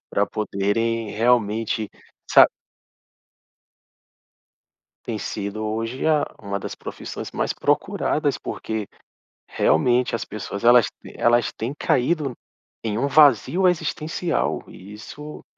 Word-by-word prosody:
pra - - +1
poderem 110 +2 -1
realmente 110 -1 +1 0.4
sa - - +8 2.6
Tem 110 -2 -3
sido 100 +1 -4
hoje, 115 +4 -3
a 155 -2 +3 0.2
uma 100 -1 -3
das - - -6
profissões - - -7
mais - - -1
procuradas - - 0
porque 110 -2 -5 0.6
realmente 125 -1 +2
as 115 - -3
pessoas, 100 -1 -6
elas 120 0 +7 0.2
t - - -12
elas 120 0 +3
têm 115 +5 -4
caído 140 +2 +1 0.5
em 110 -2 -2
um 140 - +1
vazio 150 - +5
existencial 165 -1 -1
e 100 +3 -12
isso 150 +8 -10
115 Hz, 110 wpm, -23 LUFS, 105-135 Hz, 2.6 s, sa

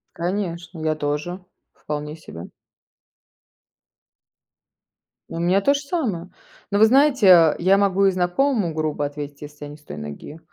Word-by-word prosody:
Конечно, 175 -1 -4
я 155 0 -1
тоже. 150 +5 -4 0.3
Вполне 150 0 -6
себе. 85 - -11 2.8
У 165 - -6
меня 180 +3 +2
то 280 - +3
же 280 - -3
самое. 235 - -3 0.4
Но, 200 - +1
вы 220 - +8
знаете, 220 - +5
я 190 +3 +4
могу 195 -1 +2
и 195 - +4
знакомому 185 - 0
грубо 155 -2 -2
ответить, 145 0 -7
если 150 0 -10
я - - -9
не 150 - -11
с 150 - -25
той 75 - -9
ноги 75 - -9
170 Hz, 145 wpm, -22 LUFS, 150-195 Hz, 2.8 s, вы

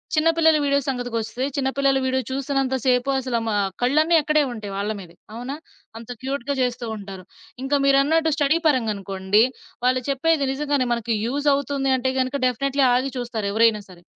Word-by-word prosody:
చిన్న 310 +1 +3
పిల్లల 320 -1 +4
వీడియో 280 0 +2
సంగతికొస్తే 245 -2 -3
చిన్న 265 -1 0
పిల్లల 275 -1 +3
వీడియో 260 0 0
చూస్తున్నంత 270 0 -1
సేపు 250 +1 +2
అసలు 255 -3 -1
మా 215 - 0 0.3
కళ్ళన్నీ 305 +7 +3
అక్కడే 305 0 +2
ఉంటాయి 215 -4 -7
వాళ్ళ 200 +2 -2
మీదే. 175 -3 -12 0.2
అవునా! 245 +4 -5 0.4
అంత 230 +1 -11
క్యూట్‌గా 275 +1 -3
జేస్తూ 245 -1 -1
ఉంటారు. 195 -2 -9 0.4
ఇంకా 270 +2 0
మీరన్నట్టు 295 +4 +3
స్టడీ 295 +1 +2
పరంగా 250 -7 +1
అనుకోండి, 195 +1 +1 0.4
వాళ్ళు 255 0 +2
చెప్పేది 285 +1 +1
నిజంగానే 285 -1 0
మనకి 235 -1 -1
యూజ్ 285 +5 -2
అవుతుంది 275 -1 -1
అంటే 260 +1 -1
గనుక 260 +2 -1
డెఫినైట్లీ 275 +2 +1
ఆగి 255 +2 0
చూస్తారెవరైనా 225 -2 +1
సరే. 175 -2 -15
260 Hz, 160 wpm, -22 LUFS, 230-280 Hz, 0.4 s, పిల్లల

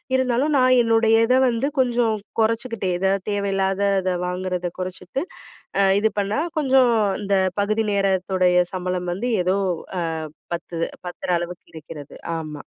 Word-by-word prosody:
இருந்தாலும் 260 +3 +1
நான் 255 -1 +5
என்னுடைய 225 -1 +4
இத 250 - +4
வந்து 240 +4 0
கொஞ்சம் 240 -3 +2 0.3
கொறைச்சுக்கிட்டேன். 225 -4 0
எதாது 190 +1 +2 0.2
தேவையில்லாதத 195 -1 0
வாங்குறத 180 -1 -3
குறைச்சுட்டு, 185 - -4 0.6
அ - - +5 0.2
இது 220 0 +2
பண்ணா 205 +8 0 0.2
கொஞ்சம், 265 -4 +4 0.3
இந்த 200 -1 +2 0.2
பகுதி 215 +2 0
நேரத்துடைய 185 -2 +2
சம்பளம் 180 -1 -2
வந்து 225 +8 -3
ஏதோ 185 +2 +1 0.4
அ - - 0 0.5
பத்துது 170 -1 -3 0.2
பத்துற 175 - -6
அளவுக்கு 175 +1 -7
இருக்கிறது. 150 -2 -10 0.2
ஆமா. 155 -2 -7
195 Hz, 125 wpm, -22 LUFS, 180-230 Hz, 0.6 s, நான்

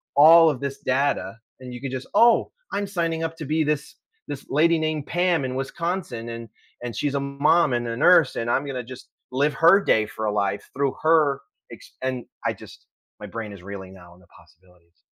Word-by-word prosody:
all 160 +3 +8
of 135 -5 -2
this 140 -1 -4
data, 130 -6 -1 0.2
and 125 -1 -9
you 125 - -8
could 135 -2 -5
just, 130 0 -5
"Oh 230 +2 +4 0.2
I'm 200 0 -2
signing 165 -4 -2
up 165 0 -3
to 155 - -6
be 155 +2 +1
this 150 -1 -2 0.3
this 145 -2 -7
lady 165 +3 +3
named 155 -2 -2
Pam 175 -4 +1
in 130 0 -4
Wisconsin 135 -4 -4
and 115 -1 -7 0.3
and 120 -2 -5
she's 145 -1 -1
a - - +1
mom, 140 +2 +2
and 120 0 -1
a 115 0 -4
nurse, 165 -1 +5
and 115 0 -2
I'm 135 +4 +1
gonna 130 -3 -4
just 130 +1 -12 0.2
live 140 +3 +1
her 170 +6 +6
day 110 - +2
for 110 - -5
a 105 - 0
life 100 -1 -2
through 140 0 0
her 155 -4 +3 0.3
ex - - -13
and 130 -2 -3 0.2
I - - +1
just" - - -14 0.3
My - - -8
brain 110 -2 -6
is 95 -3 -13
reeling 95 -1 -8
now 90 -2 -15
on 90 - -21
the 90 - -23
possibilities. 90 -1 -24
140 Hz, 210 wpm, -24 LUFS, 115-160 Hz, 0.3 s, all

